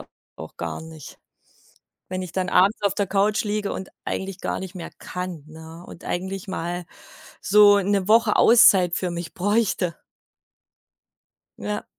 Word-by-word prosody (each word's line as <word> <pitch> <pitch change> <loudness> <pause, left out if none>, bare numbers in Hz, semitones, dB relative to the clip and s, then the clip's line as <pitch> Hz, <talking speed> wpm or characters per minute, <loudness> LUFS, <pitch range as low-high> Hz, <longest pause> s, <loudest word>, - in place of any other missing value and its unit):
au - - -10 0.3
auch - - -11
gar - - -5
nicht, 160 -2 -12 0.9
wenn 185 - -3
ich 185 -3 -7
dann 185 -1 -2
abends 200 +3 +3
auf 200 -1 +1
der 200 -1 -1
Couch 200 +2 +1
liege 210 -1 -2
und 190 - -6 0.2
eigentlich 190 -1 -4
gar - - -2
nicht 190 0 -8
mehr 175 - -7
kann, 180 -4 -6
ne, 160 +2 -12
und - - -12
eigentlich 190 +2 -4
mal 175 -1 -4 0.6
so 205 0 +6
'ne 200 -1 0
Woche 225 +2 +4
Auszeit 195 -7 +6
für 180 -1 -2
mich 170 0 -6
bräuchte. 190 -3 0 1.6
Ja. 210 0 -4
190 Hz, 150 wpm, -23 LUFS, 175-205 Hz, 1.6 s, so